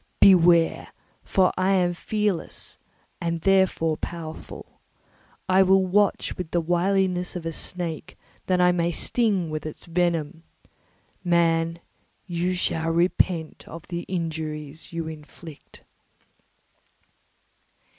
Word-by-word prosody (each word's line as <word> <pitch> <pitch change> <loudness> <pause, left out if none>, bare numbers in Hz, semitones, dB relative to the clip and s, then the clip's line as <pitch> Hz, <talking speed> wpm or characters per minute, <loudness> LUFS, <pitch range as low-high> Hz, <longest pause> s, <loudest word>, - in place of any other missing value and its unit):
Beware, 170 -3 +5 0.3
for 185 -1 +2
I 190 +1 +3
am 180 -2 +2
fearless 210 0 -3 0.4
and 170 -1 -2
therefore 190 -5 +2
powerful. 165 -2 -8 0.7
I 185 0 +5
will 190 0 +4
watch 200 +2 +1
with 180 -3 -4
the 175 - +1
wiliness 180 +2 0
of 175 -2 -5
a 165 - -2
snake, 170 -1 -6 0.3
that 185 -1 +2
I 180 0 +5
may 170 -1 +1
sting 195 -3 0
with 155 0 -3
its 155 - -8
venom. 170 -2 -1 0.8
Man, 165 -1 +2 0.4
you 180 0 -1
shall 165 -2 -1
repent 170 -1 0
of 165 0 -10
the 170 -1 -3
injuries 160 -3 -4
you 165 -1 -4
inflict." 155 -1 -11
170 Hz, 110 wpm, -25 LUFS, 165-185 Hz, 0.8 s, Beware